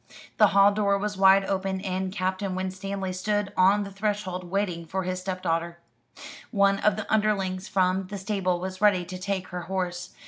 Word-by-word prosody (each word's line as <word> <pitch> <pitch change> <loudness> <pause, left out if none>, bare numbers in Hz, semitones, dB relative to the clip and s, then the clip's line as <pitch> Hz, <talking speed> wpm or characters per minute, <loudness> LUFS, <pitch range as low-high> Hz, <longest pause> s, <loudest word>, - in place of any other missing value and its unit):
The - - +7
hall 200 +1 +5
door 200 -1 +1
was 205 +1 -3
wide 195 0 +5
open, 190 0 -1
and 190 -1 -2
Captain 185 0 -2
Winstanley 190 0 -4
stood 205 +2 -1
on 195 +3 +4
the 200 - -8
threshold, 195 -2 -3
waiting 180 -2 -2
for 190 +4 -3
his 185 0 -3
stepdaughter. 170 -2 -2 0.7
One 200 -2 +3
of 210 -2 +2
the 215 - -4
underlings 195 -3 0
from 185 0 +1
the 205 +1 -6
stable 190 -2 -1
was 185 +1 -6
ready 195 -4 +4
to 185 +1 -7
take 190 -1 -3
her 180 0 -5
horse. 180 -1 -3
190 Hz, 175 wpm, -26 LUFS, 185-200 Hz, 0.7 s, The